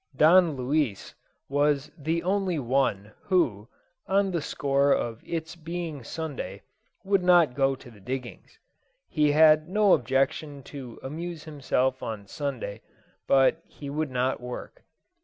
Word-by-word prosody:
Don 165 0 +5
Luis 130 -4 -1 0.3
was 145 0 +1
the 165 +2 -2
only 190 -2 0
one 120 -6 0
who, 135 - +1 0.4
on 195 +1 +2
the 170 -3 -1
score 140 0 +1
of 115 -4 0
its 160 0 -4
being 165 -4 -5
Sunday, 120 - -6 0.4
would 195 -1 +2
not 175 -6 +5
go 135 0 +2
to 125 - -14
the 105 - -16
diggings. 125 +5 -7 0.5
He 150 -3 +2
had 155 +1 +5
no 210 0 +4
objection 135 +2 0
to 130 -4 -9
amuse 165 +3 -6
himself 130 -4 -1
on 110 -3 -5
Sunday, 115 -3 -5 0.5
but 135 +4 +4
he 140 -2 -9
would 155 0 -2
not 130 +1 -1
work. 125 - -8
145 Hz, 135 wpm, -27 LUFS, 130-165 Hz, 0.5 s, Don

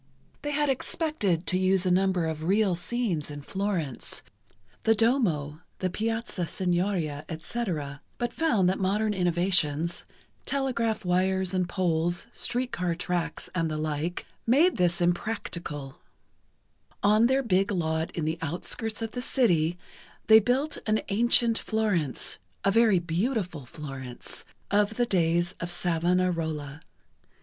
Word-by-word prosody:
They 290 - -3
had 295 0 +1
expected 260 - 0
to 185 - +2
use 190 0 +3
a 180 - +2
number 185 -1 +2
of 160 -1 -3
real 200 +1 +3
scenes 175 -4 -2
in 145 -1 -7
Florence—the 190 - -3
Duomo, 180 - +1 0.2
the 185 -1 -1
Piazza 225 -4 -2
Signoria, 175 -5 -1
etc., 160 - -4 0.2
but 240 -1 -2
found 235 - +2
that 185 - +1
modern 210 +3 +1
innovations—telegraph 185 - -1
wires 185 +1 +1
and 180 -1 0
poles, 175 -2 0
street 245 +1 -1
car 175 -1 -1
tracks, 175 -1 -2
and 165 -3 0
the 155 - -2
like—made 175 - 0
this 175 -1 +2
impracticable. 170 -6 -2 1.0
On 215 +3 +5
their 265 +2 +2
big 195 -3 +2
lot 160 -3 0
in 165 - -1
the 160 +1 -1
outskirts 205 +7 -3
of 225 - -3
the 245 - -4
city, 175 - +2 0.5
they 220 0 +9
built 255 +7 0
an 215 0 +2
ancient 230 +2 +3
Florence, 205 - -1 0.3
a 195 - +4
very 225 -2 +5
beautiful 175 - -2
Florence, 135 -4 -8 0.3
of 205 +2 +2
the 240 - +2
days 175 -3 +1
of 170 - -4
Savonarola. 165 -4 0
185 Hz, 125 wpm, -27 LUFS, 165-220 Hz, 1.0 s, they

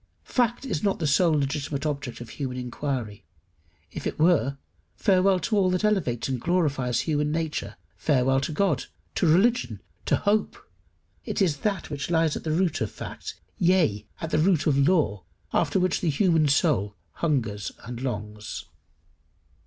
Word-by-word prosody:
Fact 240 +1 0
is 185 - -2
not 200 -2 +1
the 160 - -2
sole 160 +3 +4
legitimate 140 0 -2
object 140 -5 -3
of 120 - -8
human 130 -1 -4
inquiry. 125 -4 -4 0.7
If - - -4
it - - -4
were, 155 -4 +3 0.4
farewell 190 -2 +3
to 220 - 0
all 195 -3 +3
that 180 +1 0
elevates 185 - +1
and 130 -3 -2
glorifies 140 -8 +1
human 150 -2 0
nature 160 -1 -2 0.2
farewell 135 -2 +2
to 140 - -2
God, 155 -4 +1 0.3
to 175 - +1
religion, 225 +10 +3 0.3
to - - +4
hope! 210 +1 +1 0.7
It - - -3
is 170 -8 +2
that 195 -2 -2
which 140 0 -4
lies 165 -2 +2
at - - -5
the 160 - -2
root 170 0 +1
of 110 - 0
fact, - - -8 0.2
yea, 160 - +2
at 165 - -5
the 155 - +2
root 160 -2 +3
of 150 -4 +3
law, 140 - +2 0.3
after 165 +3 +2
which 185 -1 +1
the 175 - +1
human 160 0 +3
soul 135 - +2 0.3
hungers 115 - 0
and 120 +1 -7
longs. 105 -4 -5
150 Hz, 160 wpm, -26 LUFS, 130-180 Hz, 0.7 s, sole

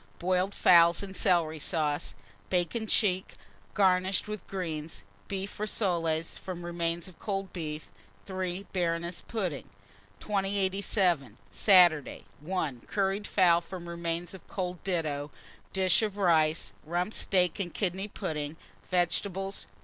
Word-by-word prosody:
Boiled 185 +2 +1
fowls 170 +1 +6
and 195 -1 -7
celery 160 -4 +2
sauce; 150 -2 -1 0.3
bacon 180 +5 0
check, 190 -4 +1 0.4
garnished 190 0 +3
with 210 -3 -6
greens; 165 -4 -5 0.2
beef 195 +1 -4
rissoles, 170 -6 0
from 175 -2 -6
remains 170 0 -2
of 185 - -15
cold 195 -2 -3
beef. 155 -3 -5 0.3
3. 185 0 -3
Baroness 170 -1 -1
pudding. 185 - -3 0.5
2087. 195 - +1
Saturday. 175 -7 +5 0.2
1. 150 -6 -2
Curried 200 +1 0
fowl, 175 -3 +4
from 175 0 -8
remains 170 +1 -3
of 190 - -12
cold 180 -2 -4
ditto; 155 -6 -1 0.4
dish 190 +1 +3
of 210 -2 -2
rice, 160 -4 +2
Rump 175 +6 -1
steak 180 -2 +2
and 180 -3 -2
kidney 190 +1 -1
pudding, 150 -5 -4 0.3
vegetables. 190 +2 0
180 Hz, 120 wpm, -29 LUFS, 165-195 Hz, 0.5 s, fowls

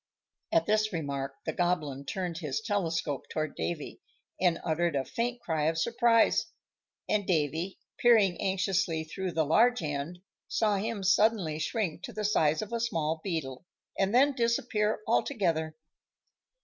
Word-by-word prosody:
At 165 - +3
this 215 +2 +2
remark 140 -5 -3
the 160 - -2
Goblin 155 -6 -1
turned 180 -3 -3
his 150 -6 -2
telescope 170 - -2
toward 155 -1 -2
Davy, 165 -4 -4 0.4
and 175 -2 +2
uttered 165 0 +1
a 135 -1 0
faint 240 +1 -2
cry 160 -7 -1
of 160 +1 +1
surprise; 230 +5 +3 0.6
and 205 -2 0
Davy, 165 +2 0 0.2
peering 215 -7 +4
anxiously 190 -3 0
through 180 +3 -4
the 160 -1 +1
large 230 +7 +3
end, 150 +4 -4 0.2
saw 210 -2 +1
him 210 0 -3
suddenly 190 -5 +3
shrink 180 0 -2
to - - -7
the 215 -1 -3
size 160 -4 +2
of 215 - -8
a 235 - 0
small 160 -8 -1
beetle, 150 -8 -3 0.3
and 195 0 +1
then 275 +5 +5
disappear 230 -3 0
altogether. 170 - 0
180 Hz, 145 wpm, -29 LUFS, 160-215 Hz, 0.6 s, then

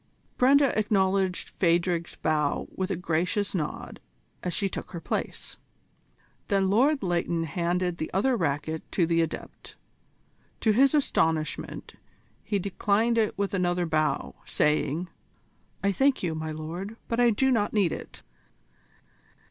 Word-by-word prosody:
Brenda 275 +2 +4
acknowledged 195 -3 +1
Phadrig's 170 -1 +1
bow 150 -2 0
with 190 0 -2
a 195 - 0
gracious 180 +4 -1
nod 155 -6 -4 0.4
as 180 - -2
she 200 +3 0
took 195 - -7
her 170 - -4
place. - - -4 0.9
Then 195 -2 +2
Lord 270 +5 +3
Leighton 170 -2 0
handed 175 +3 -1
the 155 - -3
other 245 +8 +2
racquet 160 -3 -1
to 175 - +3
the 165 0 +2
Adept. 165 - -6 0.9
To 220 - +4
his 270 +6 +4
astonishment 160 - 0 0.5
he 205 0 -1
declined 205 +4 +1
it 215 - 0
with 200 0 -1
another 180 -2 +1
bow, 155 -3 0
saying: 150 +3 0 0.8
"I 200 - +3
thank 270 +4 +2
you, 170 -3 0
my 155 0 -4
lord, 170 +8 -6
but 230 - -1
I 240 -1 +6
do 265 +5 +2
not 210 -4 +1
need 200 -6 +2
it." - - -8
185 Hz, 135 wpm, -27 LUFS, 165-210 Hz, 0.9 s, I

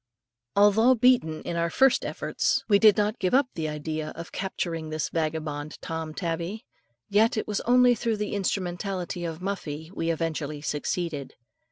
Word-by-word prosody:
Although 215 +5 +5
beaten 235 -10 +3
in 170 - -4
our 170 0 0
first 265 +7 +4
efforts, - - -1
we 200 -2 +5
did 215 -1 +6
not 210 +1 0
give 185 +5 +1
up 270 -1 +3
the 155 -2 -3
idea 155 +1 -4
of 165 0 -8
capturing 165 -4 -3
this 155 -2 -2
vagabond 155 -2 -3
Tom 160 -1 -5
tabby, 170 +4 -3 0.4
yet 220 +3 +3
it - - -2
was 210 -1 -1
only 250 0 +6
through 230 -1 -1
the 210 0 -3
instrumentality 185 -2 -2
of 165 0 -5
Muffie, 160 -5 -4
we 165 -4 -2
eventually 160 -3 -2
succeeded. 150 0 -3
175 Hz, 160 wpm, -26 LUFS, 160-210 Hz, 0.4 s, did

